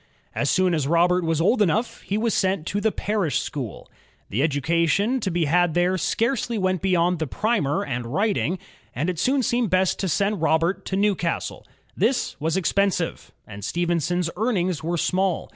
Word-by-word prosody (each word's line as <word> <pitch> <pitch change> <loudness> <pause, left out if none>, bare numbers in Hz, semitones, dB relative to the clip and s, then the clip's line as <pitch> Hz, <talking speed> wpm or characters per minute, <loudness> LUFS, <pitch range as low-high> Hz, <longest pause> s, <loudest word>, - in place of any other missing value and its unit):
As - - 0
soon 185 -1 +2
as 150 -4 0
Robert 175 +3 +3
was 165 -1 0
old 215 +7 +3
enough 210 +5 0
he 200 - -2
was 225 0 0
sent 190 -4 0
to 205 +3 -2
the 220 +1 +2
parish 195 - -1
school. 130 -8 -6 0.4
The 110 - 0
education 170 - +1
to 205 - -2
be 170 -2 0
had 175 +2 +2
there 175 +1 +2
scarcely 230 +5 0
went 185 -2 0
beyond 180 -2 +2
the 160 - -2
primer 200 - 0
and 125 -4 -3
writing, 190 - 0 0.4
and 155 +8 0
it 170 - -7
soon 265 +6 +2
seemed 240 -2 +1
best 185 0 +2
to 190 - -1
send 200 +2 0
Robert 165 +3 +1
to 190 - -2
Newcastle. 195 -4 -1 0.3
This 245 +3 0
was 160 +4 0
expensive, 190 -2 0
and 100 -1 -10
Stephenson's 175 - 0
earnings 185 - 0
were 170 +2 -1
small. 185 +2 0
180 Hz, 175 wpm, -23 LUFS, 165-200 Hz, 0.4 s, Robert